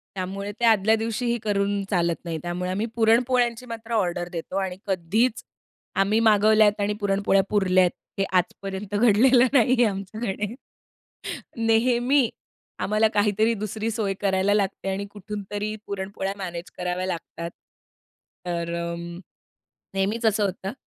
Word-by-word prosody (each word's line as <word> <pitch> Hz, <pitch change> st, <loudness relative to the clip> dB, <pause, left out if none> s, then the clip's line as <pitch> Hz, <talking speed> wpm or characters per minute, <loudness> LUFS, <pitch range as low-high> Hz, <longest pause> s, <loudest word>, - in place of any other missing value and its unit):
त्यामुळे 195 Hz, +2 st, -4 dB
ते 240 Hz, -, +2 dB
आदल्या 220 Hz, -1 st, +5 dB
दिवशीही 230 Hz, +2 st, -1 dB
करून 200 Hz, -1 st, 0 dB
चालत 170 Hz, -3 st, +2 dB
नाही. 165 Hz, -1 st, -3 dB
त्यामुळे 175 Hz, +1 st, -3 dB
आम्ही 205 Hz, +4 st, -1 dB
पुरणपोळ्यांची 240 Hz, +1 st, +2 dB
मात्र 230 Hz, -1 st, -7 dB
ऑर्डर 175 Hz, -5 st, 0 dB
देतो 170 Hz, +2 st, -5 dB
आणि 185 Hz, -1 st, -3 dB
कधीच 200 Hz, +6 st, +1 dB, 0.6 s
आम्ही 205 Hz, +3 st, +2 dB
मागवल्यात 215 Hz, 0 st, +4 dB
आणि 205 Hz, +1 st, +1 dB
पुरणपोळ्या 195 Hz, -1 st, +2 dB
पुरल्या 185 Hz, -3 st, +3 dB
आहेत 180 Hz, -, +2 dB, 0.3 s
हे 195 Hz, -, +2 dB
आजपर्यंत 195 Hz, +2 st, -3 dB
घडलेलं 240 Hz, +4 st, +5 dB
नाही 255 Hz, -2 st, +5 dB
आहे -, -, +5 dB
आमच्याकडे. 205 Hz, +2 st, -4 dB, 1.1 s
नेहमी 240 Hz, +3 st, +3 dB, 0.5 s
आम्हाला 215 Hz, +2 st, +2 dB
काहीतरी 210 Hz, +2 st, +2 dB
दुसरी 215 Hz, +1 st, -2 dB
सोय 210 Hz, -3 st, -1 dB
करायला 195 Hz, 0 st, +2 dB
लागते 195 Hz, -1 st, -1 dB
आणि 200 Hz, +1 st, -3 dB
कुठूनतरी 205 Hz, +1 st, -5 dB
पुरणपोळ्या 195 Hz, 0 st, -3 dB
मॅनेज 175 Hz, -3 st, -6 dB
कराव्या 180 Hz, +1 st, -2 dB
लागतात. 170 Hz, -1 st, -5 dB, 1.0 s
तर 170 Hz, -1 st, -2 dB
अ, 170 Hz, 0 st, -3 dB, 1.0 s
नेहमीच 205 Hz, +5 st, -1 dB
असं 215 Hz, -1 st, +2 dB
होतं. 195 Hz, 0 st, -3 dB
205 Hz, 130 wpm, -25 LUFS, 190-220 Hz, 1.1 s, आदल्या